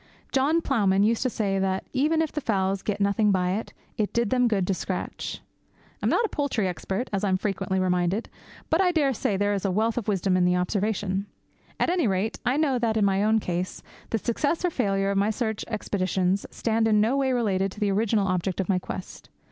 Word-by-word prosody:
John 290 Hz, +5 st, +2 dB
Ploughman 200 Hz, -9 st, +2 dB
used 225 Hz, +2 st, +2 dB
to 255 Hz, -, +1 dB
say 200 Hz, -4 st, -1 dB
that, 190 Hz, 0 st, -1 dB
even 310 Hz, +4 st, +2 dB
if 315 Hz, -, -3 dB
the 300 Hz, -, -3 dB
fowls 195 Hz, -4 st, 0 dB
got 210 Hz, -, -2 dB
nothing 200 Hz, +1 st, +2 dB
by 180 Hz, -1 st, +1 dB
it, 210 Hz, +4 st, -3 dB, 0.3 s
it 210 Hz, -, 0 dB
did 235 Hz, -3 st, +1 dB
them 250 Hz, -1 st, +3 dB
good 200 Hz, -5 st, +1 dB
to 195 Hz, -, 0 dB
scratch. -, -, -4 dB, 0.6 s
I -, -, 0 dB
am -, -, +3 dB
not 470 Hz, -, +2 dB
a -, -, -3 dB
poultry 260 Hz, -9 st, -1 dB
expert, 190 Hz, +6 st, -3 dB
as 195 Hz, 0 st, -1 dB
I 200 Hz, -, +2 dB
am 185 Hz, -, +2 dB
frequently 190 Hz, -1 st, -1 dB
reminded, 180 Hz, +3 st, 0 dB, 0.4 s
but 325 Hz, +4 st, +4 dB
I 365 Hz, -2 st, +3 dB
dare 290 Hz, -5 st, +2 dB
say 210 Hz, -, -1 dB
that -, -, 0 dB
there 205 Hz, +1 st, +1 dB
is 195 Hz, -, -2 dB
a 195 Hz, -, +1 dB
wealth 220 Hz, +5 st, +1 dB
of 225 Hz, -, -9 dB
wisdom 195 Hz, -2 st, +1 dB
in 180 Hz, -, +3 dB
the 180 Hz, 0 st, +3 dB
observation. 195 Hz, +1 st, -1 dB, 0.5 s
At -, -, +2 dB
any 350 Hz, -8 st, +2 dB
rate, 195 Hz, +3 st, -1 dB
I 250 Hz, +3 st, +1 dB
know 280 Hz, -5 st, +2 dB
that, 225 Hz, -2 st, +1 dB
in 210 Hz, -, +3 dB
my 195 Hz, 0 st, +2 dB
own 220 Hz, +1 st, +3 dB
case, 180 Hz, -3 st, -3 dB, 0.3 s
the 225 Hz, -, +1 dB
success 285 Hz, -, -1 dB
or 355 Hz, -, +1 dB
failure 195 Hz, -7 st, 0 dB
of 195 Hz, -, +1 dB
my 200 Hz, +2 st, +2 dB
search 220 Hz, -1 st, -2 dB
expeditions 190 Hz, -3 st, -1 dB
stand 225 Hz, -1 st, 0 dB
in 210 Hz, -1 st, +4 dB
no 225 Hz, +5 st, +2 dB
way 270 Hz, -1 st, +1 dB
related 195 Hz, -6 st, +1 dB
to -, -, -12 dB
the 205 Hz, -2 st, +1 dB
original 210 Hz, 0 st, +1 dB
object 185 Hz, 0 st, -1 dB
of 190 Hz, -, 0 dB
my 190 Hz, -2 st, +2 dB
quest. 180 Hz, -, -8 dB
205 Hz, 230 wpm, -26 LUFS, 190-235 Hz, 0.6 s, but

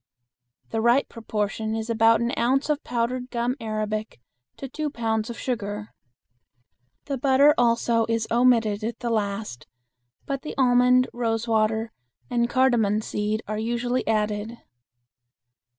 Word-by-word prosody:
The 225 Hz, -, -1 dB
right 240 Hz, +4 st, +3 dB
proportion 220 Hz, -1 st, -3 dB
is 220 Hz, 0 st, -3 dB
about 225 Hz, 0 st, +4 dB
an 235 Hz, +1 st, 0 dB
ounce 265 Hz, +5 st, +1 dB
of 300 Hz, +1 st, -2 dB
powdered 245 Hz, +1 st, -2 dB
gum 240 Hz, +1 st, -1 dB
arabic 215 Hz, -, -3 dB, 0.4 s
to 270 Hz, -, -6 dB
two 300 Hz, +3 st, -3 dB
pounds 225 Hz, -3 st, -2 dB
of 235 Hz, -, -6 dB
sugar. 210 Hz, -4 st, -4 dB, 1.1 s
The 275 Hz, -3 st, -3 dB
butter 275 Hz, +3 st, +5 dB
also 235 Hz, -2 st, +2 dB
is 225 Hz, -1 st, 0 dB
omitted 230 Hz, -3 st, +3 dB
at 230 Hz, +2 st, -4 dB
the 240 Hz, -1 st, -2 dB
last, 200 Hz, -, -3 dB, 0.6 s
but 275 Hz, -1 st, -3 dB
the 305 Hz, -, -7 dB
almond, 250 Hz, -1 st, +4 dB
rose 230 Hz, -1 st, -1 dB
water, 220 Hz, 0 st, +1 dB, 0.4 s
and 235 Hz, -1 st, +1 dB
cardamon 235 Hz, -5 st, +2 dB
seed 210 Hz, +1 st, -2 dB
are 215 Hz, +1 st, -3 dB
usually 240 Hz, +2 st, -1 dB
added. 215 Hz, +1 st, -1 dB
230 Hz, 135 wpm, -24 LUFS, 220-245 Hz, 1.1 s, butter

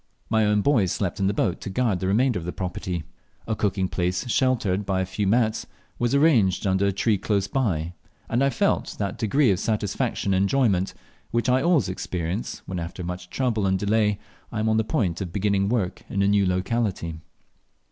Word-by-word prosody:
My 110 Hz, -1 st, +3 dB
own 105 Hz, -1 st, +2 dB
boys 110 Hz, -11 st, +3 dB
slept 95 Hz, -3 st, -2 dB
in 95 Hz, -, +2 dB
the -, -, +2 dB
boat 95 Hz, -3 st, 0 dB
to -, -, -5 dB
guard 110 Hz, -3 st, 0 dB
the 95 Hz, -, -2 dB
remainder 115 Hz, +2 st, +2 dB
of 85 Hz, -, -8 dB
my -, -, -3 dB
property; 90 Hz, -2 st, -4 dB, 0.4 s
a 110 Hz, -, -1 dB
cooking 100 Hz, -2 st, 0 dB
place 90 Hz, +4 st, -1 dB
sheltered 115 Hz, -6 st, +1 dB
by 95 Hz, -1 st, -1 dB
a 95 Hz, -, 0 dB
few 95 Hz, +2 st, -2 dB
mats 110 Hz, +1 st, +1 dB, 0.3 s
was 120 Hz, +3 st, +1 dB
arranged 120 Hz, -, +3 dB
under 95 Hz, +1 st, +2 dB
a -, -, +2 dB
tree 100 Hz, +1 st, +1 dB
close 100 Hz, -1 st, 0 dB
by, 90 Hz, -, -1 dB, 0.3 s
and 120 Hz, +4 st, +1 dB
I 140 Hz, -, +4 dB
felt 200 Hz, +8 st, 0 dB
that 100 Hz, -2 st, -3 dB
degree 120 Hz, +3 st, +3 dB
of 95 Hz, -, 0 dB
satisfaction 105 Hz, -2 st, -1 dB
and 95 Hz, +1 st, +3 dB
enjoyment 100 Hz, -6 st, +1 dB, 0.3 s
which 120 Hz, 0 st, 0 dB
I 130 Hz, +1 st, +3 dB
always 165 Hz, -, +3 dB
experience 90 Hz, +1 st, -4 dB
when, 90 Hz, -2 st, -4 dB
after 85 Hz, +2 st, -6 dB
much 90 Hz, +1 st, -6 dB
trouble 115 Hz, -5 st, 0 dB
and 95 Hz, 0 st, +2 dB
delay, 105 Hz, +1 st, +1 dB, 0.3 s
I 110 Hz, -, -3 dB
am 110 Hz, +1 st, +1 dB
on 110 Hz, -, +2 dB
the 110 Hz, -, +3 dB
point 100 Hz, -, -1 dB
of 90 Hz, -3 st, -4 dB
beginning 100 Hz, 0 st, +1 dB
work 105 Hz, -6 st, -1 dB
in 100 Hz, -1 st, 0 dB
a -, -, +3 dB
new 100 Hz, -1 st, +3 dB
locality. 90 Hz, -3 st, -1 dB
100 Hz, 200 wpm, -24 LUFS, 95-115 Hz, 0.4 s, I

